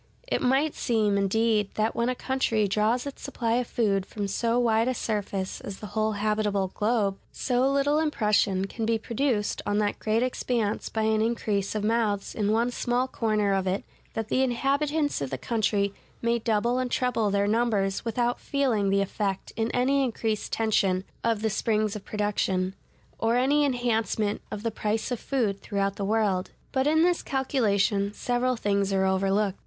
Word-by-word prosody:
It - - 0
might 270 +4 +2
seem, 215 -4 +1
indeed, 210 +1 +2
that, 220 +1 0
when 235 +1 +1
a 255 - -1
country 235 -5 0
draws 215 +5 +1
its 280 - -7
supply 230 -1 -1
of 250 -1 -1
food 200 -5 +1
from 200 +1 -4
so 230 +4 0
wide 230 -1 +3
a 255 - 0
surface 200 -4 -3
as 195 - -7
the 210 - -9
whole 220 0 +1
habitable 205 -2 0
globe, 205 -1 0
so 255 +1 +1
little 285 +2 +2
impression 210 -10 +1
can 225 +3 -5
be 225 +1 +2
produced 230 -1 -1
on 205 0 0
that 210 -1 0
great 220 +2 +1
expanse 240 -4 -1
by 220 -1 -1
any 220 0 +2
increase 210 -4 -1
of 210 - -1
mouths 215 -2 0
in 210 -1 0
one 230 +3 +2
small 245 +1 0
corner 215 -5 0
of 190 -1 0
it 190 +2 -1 0.3
that 225 -1 -3
the 260 - +2
inhabitants 280 - 0
of 140 - -2
the 135 - -3
country 200 - 0 0.3
may 235 0 +1
double 230 +3 +1
and 255 -1 -1
treble 245 -4 +1
their 200 0 +1
numbers 210 -3 +1
without 240 +1 0
feeling 250 -9 0
the 200 0 +3
effect 195 0 -3
in 225 +1 0
any 270 +3 +2
increased 225 -3 -2
tension 195 -4 +1 0.2
of 225 -2 0
the 220 - +2
springs 215 -1 0
of 210 - -6
production, 195 -3 -1 0.5
or 225 +1 +2
any 285 +4 +3
enhancement 230 -5 0
of 210 0 -6
the 230 - 0
price 215 +3 -2
of 245 - -1
food 215 -8 -1
throughout 200 0 -1
the 200 - -3
world. 200 -3 +1 0.2
But 265 +1 +1
in 315 +2 +4
this 350 0 +2
calculation 205 -7 +1
several 245 +3 0
things 200 -3 0
are 190 0 +2
overlooked. 195 +1 +1
220 Hz, 180 wpm, -27 LUFS, 200-245 Hz, 0.5 s, in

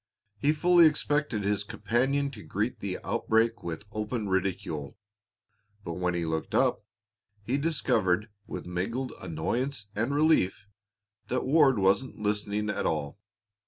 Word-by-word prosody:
He 145 +7 +3
fully 170 +2 +6
expected 145 -7 0
his 100 0 0
companion 130 +8 0
to 110 -6 -10
greet 110 +5 -2
the 95 -2 -3
outbreak 115 +1 +1
with 85 +3 -5
open 105 0 -3
ridicule, 95 -6 -2 0.9
but 85 - -4
when 90 0 -1
he 85 -1 -1
looked 80 0 -2
up, - - +2 0.6
he 120 +6 -1
discovered 105 - +1 0.2
with - - -6
mingled 115 +9 -3
annoyance 100 - -2
and 115 +6 0
relief 145 - +3 0.6
that 130 - -1
Ward 135 -2 +5
wasn't 100 +7 +2
listening 105 0 -1
at 105 - -1
all. 75 -2 -2
105 Hz, 130 wpm, -28 LUFS, 95-130 Hz, 0.9 s, fully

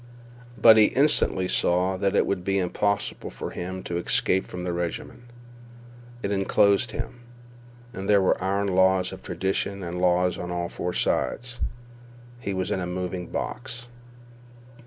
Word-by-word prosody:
But 110 -1 +8
he 110 - +8
instantly 125 -8 +2
saw 90 +1 +2
that 100 +1 0
it - - +4
would 95 -3 -2
be 95 +1 0
impossible 100 +2 -1
for - - -6
him 95 +1 -5
to 85 - -3
escape 95 +2 +1
from 90 0 -6
the 90 -1 -2
regiment. 85 +8 -4 1.0
It 100 - -1
inclosed 100 +3 +3
him. 120 - -6 0.7
And 95 -2 -5
there 100 -1 +6
were 95 -1 +1
iron 100 +1 0
laws 95 0 +3
of 95 - -9
tradition 95 +2 -2
and 90 +1 -4
law 90 0 +3
on 90 -1 -3
four 90 0 -4
sides. 120 +5 -1 0.8
He 105 -4 -4
was 95 -1 -2
in - - 0
a 90 - -3
moving 90 0 -4
box. 120 -1 -5
95 Hz, 150 wpm, -25 LUFS, 90-100 Hz, 1.0 s, But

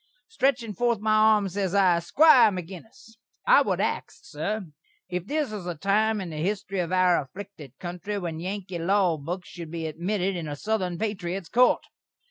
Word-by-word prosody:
Stretchin' 265 - 0
forth 235 +2 +1
my 215 +1 +1
arms, 215 -3 +4
ses 195 -1 -1
I: 185 -4 +4
"Squire 265 - +6
Maginnis, 195 +4 -9 0.3
I - - +6
would - - 0
ax, - - -2
sur, 210 - -4 0.4
if 180 0 -4
this 295 -3 -1
is 200 -4 -6
a 175 - -3
time 210 +5 +1
in 180 -4 -5
the 155 -1 -5
histry 195 0 -2
of 170 - -6
our 185 -2 +3
afflikted 165 -3 -11
kountry 180 +4 -4
when 165 -4 -4
Yankee 185 0 -5
law 180 -1 +2
books 175 +5 -6
should 170 -3 -8
be 165 0 -5
admitted 180 +5 -2
in 170 -3 -4
a 145 - -4
Southern 185 0 -2
patriot's 190 -4 -3
Court? 250 +2 +3
190 Hz, 175 wpm, -26 LUFS, 175-215 Hz, 0.4 s, Squire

